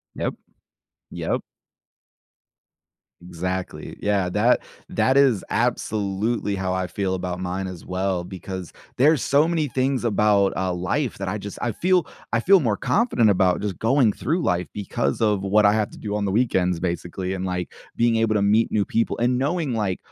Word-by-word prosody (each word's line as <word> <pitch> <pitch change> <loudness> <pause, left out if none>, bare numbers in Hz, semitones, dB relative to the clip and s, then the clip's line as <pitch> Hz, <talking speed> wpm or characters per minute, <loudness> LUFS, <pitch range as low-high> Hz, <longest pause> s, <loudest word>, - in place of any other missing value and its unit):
Yep. - - -2 0.8
Yep. - - -2 1.8
Exactly, 90 +1 -5
yeah, 100 -3 +1
that 105 +7 +3 0.3
that 130 - +1
is 135 -8 +4
absolutely 110 -2 -1
how 95 -1 -2
I 95 0 -1
feel 95 0 -2
about 90 -1 -4
mine 95 +1 -3
as 90 -3 -8
well, 90 -1 -1
because 95 0 -7 0.2
there's 145 +1 +4
so 145 +3 +3
many 165 -3 0
things 130 -1 -1
about, 105 -3 +2
uh, 95 -1 0
life 90 +10 -2
that 95 - -4
I 100 +3 -2
just 100 -1 -7
I 120 - -1
feel 180 +3 +2 0.3
I - - +3
feel 190 +11 +5
more 115 -8 +1
confident 205 - +2
about 95 -2 +3
just 100 -3 -3
going 115 -1 +3
through 165 +7 -1
life 90 0 0
because 90 -9 -2
of 105 -3 +2
what 105 +2 +4
I 100 - +5
have 105 -1 0
to - - -13
do 105 -1 -4
on 105 -1 -1
the - - 0
weekends, 95 -5 +1
basically, 90 +1 -3
and, 95 0 -4
like, 90 -1 -3 0.2
being 115 -1 +3
able 110 -1 +2
to 100 - +2
meet 105 +3 +3
new 105 - +1
people, 115 +3 -1
and 125 +1 +2
knowing, 145 -1 -1
like, 100 -4 -1
105 Hz, 175 wpm, -23 LUFS, 95-120 Hz, 1.8 s, feel